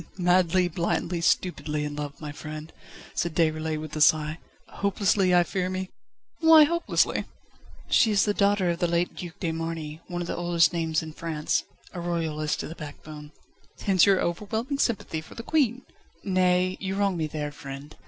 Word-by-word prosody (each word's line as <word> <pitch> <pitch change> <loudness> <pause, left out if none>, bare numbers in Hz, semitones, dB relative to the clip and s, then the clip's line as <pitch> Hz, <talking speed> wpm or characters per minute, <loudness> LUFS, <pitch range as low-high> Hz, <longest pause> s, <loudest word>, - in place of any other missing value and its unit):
"Madly, 180 0 +3
blindly, 170 0 -1
stupidly 150 -4 0
in 145 0 -5
love, 145 -1 -6
my 150 -2 -6
friend," 155 +1 -8 0.4
said 170 -2 -2
Déroulède 155 -1 +1
with 155 -1 -7
a 155 - -2
sigh. 155 +1 +4 0.3
"Hopelessly, 200 -1 +1
I 175 - +6
fear 185 +1 -2
me!" 185 0 -4 0.5
"Why 320 -1 +8
hopelessly?" 340 +3 +1 0.6
"She 225 - +4
is 205 -2 +3
the 205 - +1
daughter 200 -3 +2
of 170 - -4
the 175 - +2
late 170 +1 0
Duc 175 -1 -8
de 170 - -1
Marny, 160 -1 -5
one 175 -1 -4
of 175 - -4
the - - -3
oldest 175 0 +2
names 160 -2 0
in 160 -1 -8
France; 155 -2 -1 0.3
a 180 - -5
Royalist 160 -3 -2
to - - -5
the 160 - -7
backbone 150 -1 -10 0.3
..." - - -23
"Hence 190 -2 +4
your 195 -2 +5
overwhelming 220 - -2
sympathy 200 - -1
for 155 - -14
the 230 - -7
Queen!" 255 -4 +1 0.4
"Nay! 185 -1 +2
you 190 0 -3
wrong 200 -2 +1
me 160 -2 -1
there, 150 -1 -4
friend. 140 0 -9
170 Hz, 180 wpm, -26 LUFS, 155-190 Hz, 0.6 s, Why